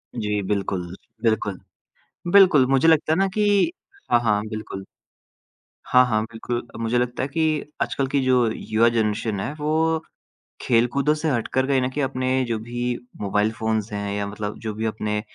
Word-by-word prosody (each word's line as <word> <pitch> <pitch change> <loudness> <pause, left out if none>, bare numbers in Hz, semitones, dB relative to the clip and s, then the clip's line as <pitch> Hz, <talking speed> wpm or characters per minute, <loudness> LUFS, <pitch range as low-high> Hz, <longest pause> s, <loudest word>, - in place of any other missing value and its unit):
जी 105 -2 -1
बिल्कुल, 95 -3 -2 0.3
बिल्कुल, 105 -4 0 0.7
बिल्कुल 185 -10 +7
मुझे 135 +4 +3
लगता 160 -1 +4
है - - +1
ना 195 - +3
कि 205 - +3 0.4
हाँ, 120 - +6
हाँ 105 -3 +2
बिल्कुल। 110 -3 -6 1.0
हाँ, 125 0 +6
हाँ 110 -2 +1
बिल्कुल 115 +1 -4 0.2
मुझे 115 +2 +1
लगता 125 0 -1
है 135 - -1
कि 155 0 0 0.2
आजकल 135 - -1
की 140 - +4
जो 125 -2 +3
युवा 115 +2 +2
जनरेशन 110 -2 -1
है 130 +8 -3
वो 160 +2 +1 0.6
खेलकूदों 125 +5 +2
से 155 0 -2
हटकर 130 +1 0
कहीं 135 -2 +2
न 125 - 0
कहीं 145 +2 -2
अपने 130 0 0
जो 115 -2 -2
भी 120 +1 -3 0.2
मोबाइल 105 +2 +1
फ़ोन्स 110 -1 -2
हैं 100 0 -3
या 100 0 -2
मतलब 105 0 -5
जो 110 -2 -4
भी 110 +1 -4
अपने 105 -1 -2
120 Hz, 170 wpm, -23 LUFS, 105-135 Hz, 1.0 s, बिल्कुल